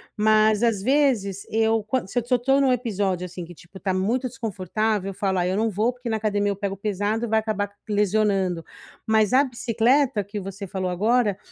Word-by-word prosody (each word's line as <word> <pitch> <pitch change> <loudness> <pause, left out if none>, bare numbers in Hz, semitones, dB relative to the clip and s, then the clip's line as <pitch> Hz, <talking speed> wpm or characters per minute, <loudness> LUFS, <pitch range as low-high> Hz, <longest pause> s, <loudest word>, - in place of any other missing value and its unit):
Mas 215 +1 +3
às 220 -5 +2
vezes 235 -7 +1
eu 225 0 +1
quando 220 -1 -2
se - - -10
se 250 - -1
eu 245 - +4
tô 270 +3 +2
num 265 -2 +3
episódio 200 -7 -1
assim 180 0 -7
que 175 +1 -10
tipo 180 +3 -15
tá 190 - 0
muito 235 +7 0
desconfortável, 215 -2 -2
eu 195 - -6
falo: 190 -1 -1
“Ai, 180 +1 0
eu 190 - -1
não 225 +1 +1
vou 215 +4 +1
porque 250 0 -10
na 220 - 0
academia 205 -1 0
eu 200 - -3
pego 195 0 -4
pesado 210 +3 -1
e - - -5
vai 220 0 +2
acabar 210 -2 -2 0.2
lesionando.”, 200 -4 +1 0.4
mas 220 0 +2
a 270 - +6
bicicleta 240 -1 +1
que 205 +2 -6
você 195 +1 -7
falou 185 0 -3
agora, 210 +3 +1
210 Hz, 210 wpm, -24 LUFS, 195-230 Hz, 0.4 s, a